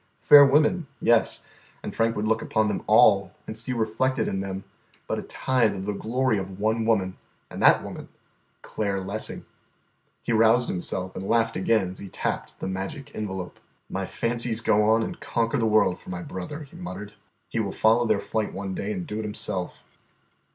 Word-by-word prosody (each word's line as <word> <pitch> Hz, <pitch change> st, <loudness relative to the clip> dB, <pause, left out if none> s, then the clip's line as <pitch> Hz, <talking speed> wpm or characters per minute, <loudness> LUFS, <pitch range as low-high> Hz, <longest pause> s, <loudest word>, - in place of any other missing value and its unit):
Fair 145 Hz, -1 st, +9 dB
women, 150 Hz, +4 st, +3 dB
yes, 115 Hz, -1 st, +2 dB, 0.4 s
and -, -, -6 dB
Frank 115 Hz, 0 st, +1 dB
would 105 Hz, +1 st, -1 dB
look 110 Hz, 0 st, +1 dB
upon 110 Hz, 0 st, +1 dB
them -, -, -2 dB
all -, -, +5 dB
and 110 Hz, -, -6 dB
see 115 Hz, +3 st, -3 dB
reflected 120 Hz, +3 st, 0 dB
in 95 Hz, -, -2 dB
them 95 Hz, 0 st, -4 dB, 0.4 s
but -, -, -2 dB
a -, -, -4 dB
tithe 120 Hz, -6 st, 0 dB
of 95 Hz, 0 st, -5 dB
the 105 Hz, -, -1 dB
glory 115 Hz, +1 st, 0 dB
of 95 Hz, 0 st, -7 dB
one 110 Hz, +2 st, 0 dB
woman, 95 Hz, -5 st, +1 dB, 0.3 s
and -, -, -6 dB
that -, -, +6 dB
woman -, -, -8 dB, 0.5 s
Claire 100 Hz, -2 st, -2 dB
Lessing. 100 Hz, +3 st, -5 dB, 0.8 s
He 115 Hz, -, -1 dB
roused 115 Hz, +2 st, +4 dB
himself 90 Hz, +1 st, -3 dB
and 95 Hz, -, -5 dB
laughed 115 Hz, 0 st, +2 dB
again 95 Hz, -1 st, +1 dB
as 95 Hz, -, -12 dB
he 100 Hz, -, -8 dB
tapped -, -, -4 dB
the -, -, -4 dB
magic 95 Hz, +10 st, -5 dB
envelope. 95 Hz, -4 st, -5 dB, 0.3 s
"My 95 Hz, -1 st, -3 dB
fancies 115 Hz, -1 st, -1 dB
go 105 Hz, -1 st, +3 dB
on 110 Hz, +1 st, +4 dB
and -, -, -5 dB
conquer 115 Hz, +3 st, -1 dB
the 115 Hz, -, +2 dB
world 105 Hz, -4 st, +3 dB
for -, -, -13 dB
my 90 Hz, -1 st, -5 dB
brother," 95 Hz, -, -6 dB
he 140 Hz, -, -14 dB
muttered. 95 Hz, +4 st, -7 dB, 0.3 s
"He 115 Hz, -, -3 dB
will 100 Hz, -3 st, -1 dB
follow 115 Hz, +4 st, +3 dB
their 110 Hz, -2 st, +2 dB
flight 110 Hz, 0 st, -2 dB
one 95 Hz, 0 st, -4 dB
day 100 Hz, +2 st, -3 dB
and 90 Hz, -4 st, -4 dB
do 105 Hz, -, -5 dB
it -, -, -3 dB
himself." 95 Hz, -4 st, -4 dB
110 Hz, 190 wpm, -25 LUFS, 95-115 Hz, 0.8 s, Fair